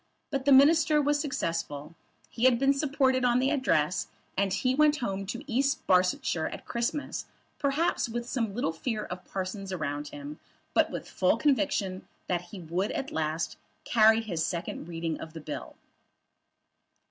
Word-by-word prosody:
But 270 Hz, -2 st, -2 dB
the 285 Hz, -, +4 dB
Minister 305 Hz, +3 st, +6 dB
was 290 Hz, 0 st, +2 dB
successful. 165 Hz, -, -3 dB, 0.4 s
He 235 Hz, -, 0 dB
had 255 Hz, -2 st, +6 dB
been 275 Hz, +2 st, +4 dB
supported 270 Hz, -2 st, +1 dB
on 245 Hz, -1 st, +4 dB
the 265 Hz, +2 st, +2 dB
Address; 185 Hz, -, +1 dB, 0.3 s
and 195 Hz, 0 st, +1 dB
he 255 Hz, +7 st, +1 dB
went 300 Hz, +2 st, +4 dB
home 195 Hz, -6 st, -3 dB
to 235 Hz, +6 st, -5 dB
East 275 Hz, +2 st, 0 dB
Barsetshire 180 Hz, -3 st, +2 dB
at -, -, -8 dB
Christmas, 235 Hz, +5 st, -2 dB, 0.3 s
perhaps 285 Hz, -1 st, +1 dB
with 240 Hz, +1 st, -4 dB
some 230 Hz, -6 st, -2 dB
little 225 Hz, -9 st, 0 dB
fear 215 Hz, +5 st, -3 dB
of 180 Hz, 0 st, -7 dB
the -, -, -29 dB
parsons 190 Hz, +1 st, -4 dB
around 150 Hz, -4 st, -3 dB
him; 145 Hz, +1 st, -8 dB, 0.3 s
but -, -, +4 dB
with -, -, -5 dB
a -, -, -14 dB
full -, -, +2 dB
conviction 265 Hz, -10 st, 0 dB, 0.2 s
that 175 Hz, -2 st, 0 dB
he 200 Hz, -, -8 dB
would 175 Hz, +5 st, -2 dB
at 275 Hz, -, -3 dB
least 160 Hz, +1 st, -2 dB, 0.3 s
carry 220 Hz, -1 st, +5 dB
the 205 Hz, -7 st, -5 dB
second 170 Hz, 0 st, -3 dB
reading 165 Hz, -1 st, -3 dB
of 160 Hz, -, -8 dB
his 160 Hz, -, -7 dB
bill. 150 Hz, -, -6 dB
220 Hz, 170 wpm, -29 LUFS, 170-270 Hz, 0.4 s, Minister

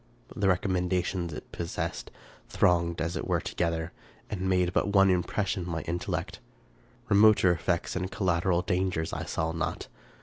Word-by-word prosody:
The 100 Hz, -, +1 dB
recommendations 90 Hz, -1 st, 0 dB
it 75 Hz, -, -9 dB
possessed 85 Hz, -1 st, -4 dB, 0.4 s
thronged 85 Hz, -1 st, +2 dB
as 85 Hz, +2 st, -2 dB
it 80 Hz, -, -3 dB
were -, -, +2 dB
together, 85 Hz, -1 st, -2 dB, 0.4 s
and 95 Hz, -2 st, -2 dB
made 90 Hz, -1 st, +2 dB
but -, -, +2 dB
one 95 Hz, -1 st, +5 dB
impression 90 Hz, +1 st, -1 dB
on -, -, -6 dB
my 80 Hz, -1 st, -2 dB
intellect. 85 Hz, +3 st, -3 dB, 0.7 s
Remoter 105 Hz, -2 st, +6 dB
effects 85 Hz, 0 st, -1 dB
and 90 Hz, 0 st, -2 dB
collateral 90 Hz, -3 st, +1 dB
dangers 90 Hz, -3 st, -1 dB
I -, -, -3 dB
saw 80 Hz, 0 st, -1 dB
not. 80 Hz, -1 st, -3 dB
90 Hz, 145 wpm, -28 LUFS, 85-95 Hz, 0.7 s, Remoter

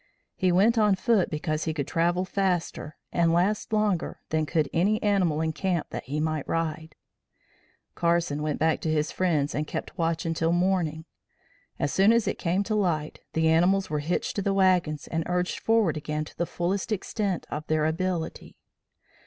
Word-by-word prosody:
He 185 Hz, -2 st, +2 dB
went 215 Hz, +6 st, +4 dB
on 210 Hz, -2 st, +4 dB
foot 200 Hz, -1 st, +2 dB
because 155 Hz, 0 st, -2 dB
he 160 Hz, -1 st, -2 dB
could 140 Hz, -3 st, -2 dB
travel 175 Hz, +2 st, +1 dB
faster 180 Hz, -5 st, -2 dB
and 170 Hz, -1 st, +2 dB
last 185 Hz, +7 st, +1 dB
longer 210 Hz, -5 st, 0 dB
than 155 Hz, -1 st, 0 dB
could 155 Hz, -3 st, +1 dB
any 205 Hz, +6 st, +2 dB
animal 185 Hz, -7 st, +2 dB
in 160 Hz, 0 st, -1 dB
camp 180 Hz, -1 st, -2 dB
that -, -, -5 dB
he 145 Hz, +4 st, -3 dB
might 155 Hz, -2 st, -1 dB
ride. 160 Hz, -1 st, -3 dB, 1.0 s
Carson 170 Hz, -3 st, 0 dB
went 150 Hz, -1 st, -1 dB
back 160 Hz, 0 st, +1 dB
to 160 Hz, -, -1 dB
his 155 Hz, 0 st, 0 dB
friends 155 Hz, -6 st, 0 dB
and 150 Hz, +1 st, -2 dB
kept -, -, -6 dB
watch 165 Hz, 0 st, 0 dB
until 165 Hz, 0 st, 0 dB
morning. 175 Hz, -3 st, 0 dB, 0.7 s
As 145 Hz, -, -1 dB
soon 195 Hz, +3 st, +5 dB
as 230 Hz, -1 st, +2 dB
it -, -, -2 dB
came 185 Hz, +3 st, +1 dB
to 215 Hz, -, -3 dB
light, 170 Hz, -8 st, 0 dB
the 160 Hz, 0 st, +2 dB
animals 175 Hz, +3 st, +3 dB
were 150 Hz, -, 0 dB
hitched 160 Hz, +5 st, -2 dB
to -, -, +1 dB
the 195 Hz, 0 st, 0 dB
wagons 180 Hz, -6 st, +2 dB
and 165 Hz, -, -2 dB
urged 180 Hz, 0 st, -1 dB
forward 225 Hz, -8 st, +2 dB
again 150 Hz, 0 st, -3 dB
to -, -, -14 dB
the 170 Hz, -, -2 dB
fullest 185 Hz, +5 st, -2 dB
extent 200 Hz, -2 st, -2 dB
of 150 Hz, +1 st, -5 dB
their 155 Hz, -1 st, +1 dB
ability. 170 Hz, +1 st, -3 dB
170 Hz, 180 wpm, -26 LUFS, 155-190 Hz, 1.0 s, soon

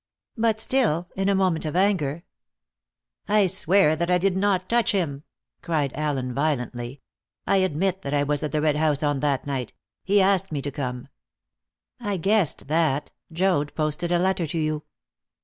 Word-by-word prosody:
But 225 Hz, -2 st, +1 dB
still, 215 Hz, -, +1 dB
in 195 Hz, +1 st, 0 dB
a 200 Hz, -, +3 dB
moment 185 Hz, -4 st, +1 dB
of 155 Hz, 0 st, -4 dB
anger 175 Hz, -5 st, +1 dB, 0.5 s
" -, -, -54 dB
"I 200 Hz, -, +5 dB
swear 185 Hz, -2 st, +3 dB
that 170 Hz, +2 st, -2 dB
I 180 Hz, -, +4 dB
did 185 Hz, +1 st, +1 dB
not 190 Hz, -1 st, +1 dB
touch 235 Hz, -2 st, +2 dB
him!" 155 Hz, -8 st, -1 dB, 0.4 s
cried 150 Hz, -5 st, -1 dB
Allen 140 Hz, -4 st, -2 dB
violently. 125 Hz, -3 st, -2 dB, 0.4 s
"I 195 Hz, -, +3 dB
admit 185 Hz, +1 st, 0 dB
that 140 Hz, -, -5 dB
I 145 Hz, -1 st, +2 dB
was 145 Hz, 0 st, 0 dB
at 150 Hz, -2 st, -3 dB
the 150 Hz, -, 0 dB
Red 150 Hz, -1 st, +2 dB
House 150 Hz, -2 st, +1 dB
on 145 Hz, -2 st, +1 dB
that 140 Hz, -1 st, 0 dB
night. 135 Hz, -5 st, -4 dB, 0.3 s
He 200 Hz, +1 st, +3 dB
asked 195 Hz, -1 st, +2 dB
me 150 Hz, -, -2 dB
to 145 Hz, -, -3 dB
come." 125 Hz, -2 st, -5 dB, 0.9 s
"I 205 Hz, -5 st, -2 dB
guessed 195 Hz, -6 st, +1 dB
that. 150 Hz, -2 st, +1 dB, 0.2 s
Joad 165 Hz, -4 st, 0 dB
posted 155 Hz, +2 st, -1 dB
a 175 Hz, -, +4 dB
letter 180 Hz, -1 st, 0 dB
to 160 Hz, -, -4 dB
you." 155 Hz, -1 st, -1 dB
160 Hz, 175 wpm, -24 LUFS, 145-190 Hz, 0.9 s, I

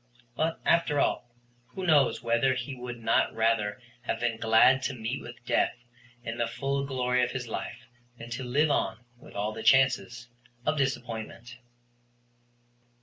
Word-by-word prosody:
But, 160 Hz, +4 st, -1 dB
after 160 Hz, -4 st, +3 dB
all, 120 Hz, -, 0 dB, 0.4 s
who 185 Hz, +9 st, -6 dB
knows 150 Hz, -6 st, +3 dB
whether 120 Hz, +3 st, +2 dB
he 130 Hz, +2 st, -4 dB
would 125 Hz, -1 st, -7 dB
not 115 Hz, -, +1 dB
rather 110 Hz, 0 st, +1 dB, 0.2 s
have 120 Hz, -, -3 dB
been 120 Hz, -1 st, 0 dB
glad 115 Hz, +4 st, +5 dB
to 130 Hz, 0 st, -2 dB
meet 120 Hz, +3 st, -4 dB
with 120 Hz, 0 st, -11 dB
death 120 Hz, 0 st, +1 dB, 0.5 s
in 115 Hz, 0 st, -5 dB
the 120 Hz, -, +1 dB
full 140 Hz, +3 st, -2 dB
glory 125 Hz, -2 st, +1 dB
of 120 Hz, -, -1 dB
his 125 Hz, -2 st, -4 dB
life 110 Hz, -, -6 dB, 0.3 s
than 115 Hz, 0 st, -10 dB
to 125 Hz, +2 st, -4 dB
live 145 Hz, +5 st, +2 dB
on 125 Hz, -3 st, -1 dB
with -, -, -15 dB
all 105 Hz, +1 st, -1 dB
the -, -, -6 dB
chances 125 Hz, -2 st, +3 dB, 0.4 s
of -, -, +2 dB
disappointment. 120 Hz, -3 st, -3 dB
125 Hz, 155 wpm, -28 LUFS, 115-135 Hz, 0.5 s, glad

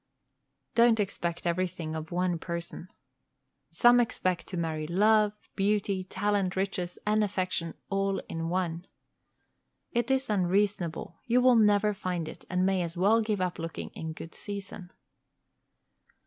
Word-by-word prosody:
Don't 235 Hz, -1 st, +5 dB
expect 175 Hz, -4 st, -2 dB
everything 170 Hz, -2 st, -1 dB
of 160 Hz, 0 st, -6 dB
one 175 Hz, -1 st, 0 dB
person. 170 Hz, +1 st, -5 dB, 0.8 s
Some 240 Hz, 0 st, +5 dB
expect 185 Hz, -7 st, 0 dB
to 185 Hz, -, -5 dB
marry 160 Hz, -2 st, -2 dB
love, 210 Hz, +4 st, +4 dB, 0.2 s
beauty, 200 Hz, -1 st, +1 dB
talent, 195 Hz, -1 st, 0 dB
riches, 185 Hz, -2 st, -2 dB
and 215 Hz, 0 st, +3 dB
affection 185 Hz, -4 st, -1 dB, 0.2 s
all 195 Hz, 0 st, +1 dB
in 165 Hz, 0 st, -3 dB
one. 175 Hz, -1 st, -2 dB, 1.0 s
It 240 Hz, +2 st, 0 dB
is 265 Hz, 0 st, +1 dB
unreasonable; 190 Hz, -4 st, 0 dB
you 240 Hz, +1 st, +4 dB
will 250 Hz, 0 st, +6 dB
never 210 Hz, -1 st, +4 dB
find 180 Hz, -4 st, -3 dB
it, -, -, -10 dB
and 180 Hz, 0 st, +1 dB
may 190 Hz, -1 st, +2 dB
as 170 Hz, 0 st, -4 dB
well 210 Hz, +5 st, +4 dB
give 215 Hz, -3 st, -1 dB
up 180 Hz, -1 st, -2 dB
looking 165 Hz, 0 st, -5 dB
in 160 Hz, 0 st, -6 dB
good 165 Hz, +1 st, -9 dB
season. 200 Hz, -2 st, -7 dB
185 Hz, 135 wpm, -29 LUFS, 170-210 Hz, 1.0 s, will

